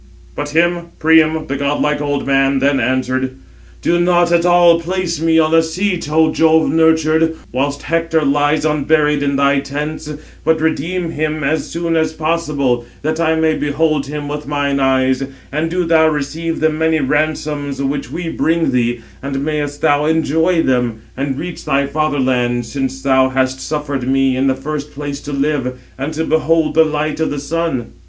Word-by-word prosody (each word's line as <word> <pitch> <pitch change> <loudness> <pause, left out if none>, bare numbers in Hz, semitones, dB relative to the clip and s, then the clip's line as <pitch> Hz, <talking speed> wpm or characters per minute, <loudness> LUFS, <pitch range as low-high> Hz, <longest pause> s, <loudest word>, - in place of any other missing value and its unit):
But 145 0 -4
him 170 +2 +1
Priam, 160 0 +3
the 135 - -3
godlike 145 +1 0
old 145 -1 -2
man, 135 0 +2
then, 140 0 +2
answered: 130 +1 -1 0.5
"Do 175 - +2
not 175 0 +3
at 170 0 +3
all 175 -1 +5
place 175 -2 -2
me 165 0 +3
on 160 0 +3
a 165 - +6
seat, 175 0 -2
Ο 155 0 +3
Jove 160 0 +3
nurtured, 160 0 +3 0.2
whilst 140 +3 -2
Hector 165 -1 0
lies 145 +2 +2
unburied 150 -1 +2
in 140 -1 0
thy 140 0 +3
tents; 150 +2 -5 0.3
but 160 0 +2
redeem 165 +2 -1
him 155 -1 -2
as 155 +3 -1
soon 170 0 -2
as 160 -1 +1
possible, 150 -6 -1 0.2
that 155 +2 -1
I 160 -1 +2
may 160 0 +2
behold 150 -1 0
him 145 0 -5
with 150 0 -5
mine 140 -1 0
eyes; 130 0 +2 0.3
and 155 +3 -1
do 180 +1 -1
thou 160 -1 +4
receive 155 +2 -2
the 155 0 +3
many 160 +1 +1
ransoms 150 0 -1
which 140 +1 -2
we 170 0 -5
bring 165 0 0
thee; 120 -1 0 0.2
and 140 0 -3
mayest 145 -2 -3
thou 145 +1 +2
enjoy 160 +2 +2
them, 120 -4 0
and 135 0 -3
reach 175 +3 -6
thy 140 +1 +1
father 150 0 -1
land, 120 -2 0
since 135 +2 -4
thou 130 -1 +3
hast 130 0 0
suffered 145 -4 -3
me 135 0 +2
in 135 +1 +1
the 130 - +2
first 145 +2 -5
place 145 -1 -5
to 145 - -7
live, 140 -3 -1 0.2
and 135 +4 -4
to 160 - -1
behold 160 0 +1
the 160 0 +5
light 155 0 -2
of 160 - 0
the 145 - -4
sun." 145 -3 -3
150 Hz, 175 wpm, -17 LUFS, 140-160 Hz, 0.5 s, a